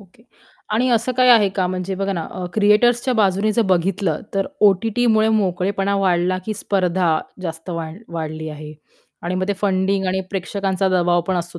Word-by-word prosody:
Okay. 200 +3 -21 0.5
आणि 245 +4 +2
असं 235 +2 +1
काही 250 0 +3
आहे 215 -4 +6
का, 190 -2 -1
म्हणजे 185 +1 -3
बघा 195 +1 -2
ना, 170 -3 -3
अ, 185 - -6
क्रिएटर्सच्या 240 +4 +3
बाजूने 205 0 +2
जर 230 - +2
बघितलं, 180 -2 0
तर 195 - 0 0.2
ओ-टी-टीमुळे 220 +2 +2
मोकळेपणा 195 +1 -1
वाढला, 185 -1 +1
की 215 - -2
स्पर्धा 180 -5 0 0.2
जास्त 165 +1 -6
वाढ 165 +1 -5 0.2
वाढली 155 0 -5
आहे? 150 0 -9 0.5
आणि 175 +1 -3
मग 185 +1 -2
ते - - +2
फंडिंग 195 -1 +1
आणि 190 +1 0
प्रेक्षकांचा 195 0 -1
दबाव 175 -1 +2
पण 190 -1 0
असतो 170 0 -5
190 Hz, 170 wpm, -20 LUFS, 175-205 Hz, 0.5 s, आहे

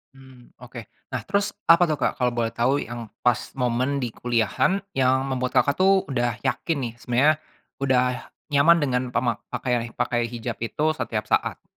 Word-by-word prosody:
Mmm, 130 -2 -17
oke. 120 -1 -9 0.3
Nah, 125 -4 -3
terus 200 - -1
apa 170 +1 +6
tuh, 155 - 0
Kak, - - -1
kalau 125 -1 +2
boleh 115 -1 0
tahu 130 +4 +1
yang 120 -2 -7 0.2
pas 120 -1 +3 0.2
momen 125 +2 0
di 120 - -3
kuliahan 120 - 0
yang 130 0 +2
membuat 130 -1 -2
Kakak, 140 +2 0
tuh 190 0 +4
udah 120 -3 0
yakin 150 +3 -1
nih, 115 -1 -4
sebenernya 140 +6 +2 0.4
udah 125 -2 +1 0.2
nyaman 160 +4 +5
dengan 125 -2 0
pemak 120 -2 -1
pakai 120 -1 -2
pakai 120 -1 0
hijab 115 -2 -5
itu 145 +8 0
setiap 115 -9 -3
saat? - - 0
125 Hz, 170 wpm, -24 LUFS, 120-140 Hz, 0.4 s, apa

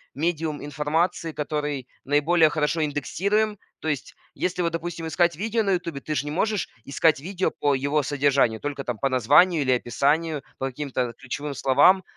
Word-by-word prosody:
медиум 160 -1 -2
информации, 155 +3 -1
который 150 -3 -3 0.2
наиболее 155 +3 +4
хорошо 155 +1 0
индексируем. 200 +8 0 0.2
То 155 - -3
есть 145 - -3 0.2
если 180 0 -1
вот, 170 - 0
допустим, 165 0 -4
искать 170 +1 +2
видео 225 +6 0
на 200 -2 +1
"Ютубе", 170 -5 -3
ты 155 - -3
ж - - 0
не 150 - -5
можешь 210 +5 0 0.2
искать 145 +2 +2
видео 185 +5 -2
по 145 -1 +1
его 140 +3 +1
содержанию, 135 -5 +2
только 145 -1 -4
там 125 -3 -3
по 135 +4 0
названию 145 +7 +4
или 130 -2 +1
описанию, 145 +6 0 0.2
по 135 - -2
каким-то 130 -3 -3
ключевым 140 +4 -5
словам. 145 +9 +4
150 Hz, 170 wpm, -25 LUFS, 140-170 Hz, 0.2 s, наиболее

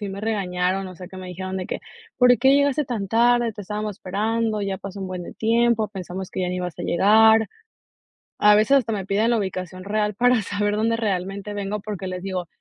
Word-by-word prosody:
sí 205 - -4
me 195 +1 -6
regañaron. 190 -3 -1
O 185 - -10
sea 180 0 -9
que 190 - -11
me 185 -1 -8
dijeron 185 +1 -5
de 185 - -4
que: - - -4 0.4
''¿Por 250 -1 +6
qué 265 +2 +5
llegaste 285 +1 +2
tan 225 -6 -3
tarde?, 235 +1 +3
te 205 -1 -8
estábamos 210 0 -4
esperando, 215 +3 -1
ya 195 -1 -2
pasó 195 0 -8
un 190 - -4
buen 185 -1 -5
de - - -9
tiempo. 230 -1 +2
Pensamos 185 0 -6
que - - -4
ya 180 - 0
no 180 - -2
ibas 180 -3 -4
a - - -4
llegar''. 220 +4 +5 1.0
A 210 0 +7
veces 250 +7 +5
hasta 230 -3 -2
me 195 -3 -3
piden 210 +4 +1
la 235 - +3
ubicación 185 -2 -5
real 210 +1 -1
para 245 +2 +3
saber 205 +1 -1
dónde 225 +2 +1
realmente 200 -1 -3
vengo 205 0 -3
porque 200 -2 -6
les 185 0 -5
digo 185 -2 -3
205 Hz, 225 wpm, -23 LUFS, 185-225 Hz, 1.0 s, A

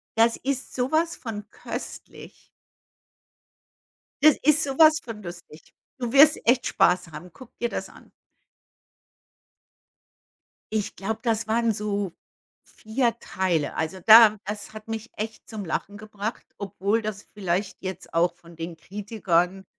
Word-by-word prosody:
Das 230 +1 +4
ist 270 0 -3
sowas 315 +7 +1
von 215 -4 -7
köstlich. - - -9 1.7
Das 310 -2 +7
ist 305 +2 +4
sowas 310 +3 +5
von 225 -3 -8
lustig. 175 -3 -11 0.3
Du 240 -1 -3
wirst 290 +2 +7
echt 245 +1 +3
Spaß 180 -1 +2
haben. 160 +4 -9
Guck 255 -3 -14
dir 235 - +1
das - - -5
an. - - -17 2.7
Ich 210 -2 -2
glaube, 220 +3 -3
das 225 -2 0
waren 230 +1 +2
so 205 -3 -2 0.5
4 235 +1 -1
Teile. 175 -6 -1
Also 160 +4 -3
da 220 -1 +9
das 210 +1 -6
hat 215 0 -10
mich 225 0 -5
echt 215 +1 -6
zum 210 -3 -6
Lachen 200 +5 -3
gebracht, 215 +1 -6
obwohl 200 +2 -1
das 210 -1 -4
vielleicht 190 -1 -2
jetzt 190 -1 -6
auch 170 +1 +3
von 170 -1 -16
den 165 +1 -6
Kritikern 190 0 -1
215 Hz, 130 wpm, -25 LUFS, 190-235 Hz, 2.7 s, da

